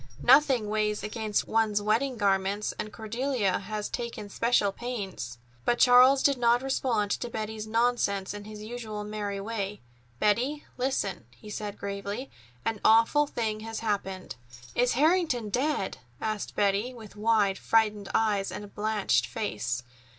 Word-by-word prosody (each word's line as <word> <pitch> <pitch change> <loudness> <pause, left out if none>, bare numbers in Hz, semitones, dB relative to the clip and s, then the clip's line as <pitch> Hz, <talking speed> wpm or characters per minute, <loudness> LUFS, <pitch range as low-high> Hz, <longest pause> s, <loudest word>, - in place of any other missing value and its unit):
Nothing 265 -8 +5
weighs 210 0 0
against 215 -1 -1
one's 220 -2 +2
wedding 230 +5 +1
garments, 200 0 +1
and 215 - -4
Cordelia 225 -2 -1
has 210 +1 -4
taken 235 -4 -5
special 230 -2 +2
pains." 195 - -5 0.3
But 240 - +2
Charles 255 +3 +7
did 280 -3 +3
not 240 +1 +3
respond 240 -6 0
to 240 - -2
Betty's 215 -1 -4
nonsense 225 -4 +1
in 205 0 -8
his 210 0 -9
usual 215 -2 -5
merry 205 -1 -4
way. 205 -1 -4 0.4
"Betty, 245 - +1
listen," 205 - -1
he 125 - -13
said 205 -1 -5
gravely. 200 +5 -5 0.3
"An 225 -2 -1
awful 230 +7 +5
thing 220 -5 -2
has 225 0 -5
happened." 195 - -3 0.4
"Is 245 0 +2
Harrington 305 - +2
dead?" 265 -4 -1 0.2
asked 215 -2 -3
Betty, 205 +5 +1
with 220 -4 -12
wide, 210 -2 +2
frightened 210 -3 +2
eyes 205 -3 +1
and 205 -1 -8
blanched 205 - +1
face. 120 +1 -3
215 Hz, 140 wpm, -28 LUFS, 205-240 Hz, 0.4 s, Charles